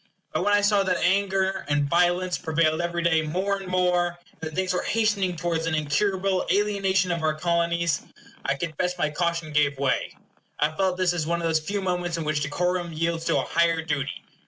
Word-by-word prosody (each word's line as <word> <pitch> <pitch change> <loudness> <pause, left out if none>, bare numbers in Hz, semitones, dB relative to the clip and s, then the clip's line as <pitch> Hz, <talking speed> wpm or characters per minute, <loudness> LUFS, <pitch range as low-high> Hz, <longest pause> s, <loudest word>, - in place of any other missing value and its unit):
But - - 0
when 205 - +2
I 205 - +3
saw 205 0 +3
that 185 -2 +1
anger 190 +1 +1
and 145 0 +2
violence 175 +3 +2
prevailed 160 -1 +1
every 170 0 -2
day 160 -2 +3
more 185 +6 -1
and 195 -1 -8
more, 180 -1 +1
and - - -31
that 160 -1 -5
things 185 -1 0
were 180 - 0
hastening 210 -5 +1
towards 165 0 -1
an 160 - 0
incurable 185 +5 +1
alienation 195 -2 +1
of 170 -1 -1
our 155 -1 +1
Colonies, 170 -1 0 0.4
I 135 - 0
confess 170 +4 -2
my 155 -4 0
caution 170 -1 -2
gave 145 -1 +2
way. 135 -1 -1 0.4
I 150 +2 +1
felt 190 -1 +1
this 185 -1 +2
as 160 -3 -2
one 170 +1 0
of 170 - -1
those 160 -1 +2
few 200 +5 -3
moments 175 -2 -1
in 165 - -3
which 150 -1 -1
decorum 175 +4 -1
yields 165 +1 -2
to - - +2
a - - +1
higher 170 -1 +2
duty. 145 -4 -3
170 Hz, 205 wpm, -25 LUFS, 160-185 Hz, 0.4 s, I